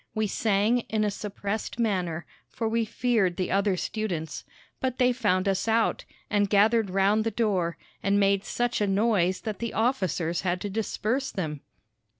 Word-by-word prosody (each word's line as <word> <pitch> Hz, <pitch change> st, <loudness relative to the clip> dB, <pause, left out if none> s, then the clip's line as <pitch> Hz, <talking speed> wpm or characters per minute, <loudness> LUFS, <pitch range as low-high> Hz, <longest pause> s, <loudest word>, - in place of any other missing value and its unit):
We 215 Hz, 0 st, +1 dB
sang 210 Hz, +3 st, +2 dB
in 215 Hz, -1 st, +1 dB
a 210 Hz, -, +1 dB
suppressed 205 Hz, +2 st, -4 dB
manner, 180 Hz, -8 st, -1 dB, 0.2 s
for 225 Hz, -, -3 dB
we 225 Hz, 0 st, +1 dB
feared 215 Hz, -6 st, +1 dB
the 185 Hz, -, -1 dB
other 195 Hz, -1 st, +2 dB
students. 180 Hz, -7 st, -3 dB, 0.4 s
But 260 Hz, -1 st, -2 dB
they 250 Hz, -1 st, +4 dB
found 200 Hz, -6 st, +1 dB
us 195 Hz, +2 st, 0 dB
out, 225 Hz, 0 st, +1 dB, 0.2 s
and 205 Hz, -1 st, +1 dB
gathered 215 Hz, +1 st, +4 dB
round 195 Hz, +3 st, +3 dB
the 225 Hz, -, 0 dB
door, 200 Hz, -6 st, 0 dB, 0.2 s
and 200 Hz, +1 st, +2 dB
made 195 Hz, -1 st, +3 dB
such 240 Hz, 0 st, -1 dB
a 205 Hz, -, +2 dB
noise 195 Hz, -3 st, +2 dB
that 215 Hz, -3 st, -4 dB
the 235 Hz, -1 st, -4 dB
officers 185 Hz, -, 0 dB
had 180 Hz, -1 st, 0 dB
to 205 Hz, -, -4 dB
disperse 225 Hz, +5 st, -1 dB
them. 155 Hz, -7 st, -4 dB
205 Hz, 165 wpm, -27 LUFS, 190-225 Hz, 0.4 s, they